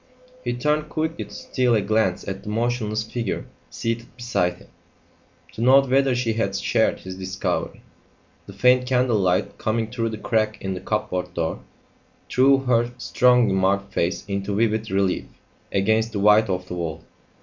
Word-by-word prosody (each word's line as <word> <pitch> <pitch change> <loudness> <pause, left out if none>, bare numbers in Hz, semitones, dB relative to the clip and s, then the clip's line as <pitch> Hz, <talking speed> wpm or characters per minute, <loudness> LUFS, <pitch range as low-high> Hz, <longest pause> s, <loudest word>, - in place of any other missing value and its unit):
He 120 - -1
turned 150 +5 0
quickly 160 +1 -2
to - - -17
steal 125 -3 0
a 105 - +2
glance 100 -2 0
at 95 0 -4
the - - -8
motionless 110 -1 -1
figure 110 -2 -3 0.2
seated 115 0 -3
beside 100 -8 0
him, - - -18 0.9
to - - -6
note 135 +2 +5
whether 135 -1 +3
she 120 -2 0
had 100 -3 -1
shared - - +1
his 95 0 -7
discovery. 95 0 -3 0.6
The 100 - -9
faint 125 +5 +3
candle 125 -3 +2
light 90 -2 0
coming 110 0 -1
through 115 -2 -1
the 110 - -5
crack 110 0 0
in 95 0 -3
the 90 - -5
cupboard 90 -4 -2
door, 80 -1 -2 0.7
threw 135 +2 +5
her 120 -2 +2
strongly 125 -6 +3
marked 100 +1 +1
face 85 +2 -1
into 100 0 -2
vivid 110 0 +1
relief 95 -1 0 0.5
against 110 +3 +1
the 100 - -2
white 105 +1 +5
of 90 -1 -2
the - - -6
wall. 80 -2 -4
110 Hz, 165 wpm, -23 LUFS, 95-120 Hz, 0.9 s, note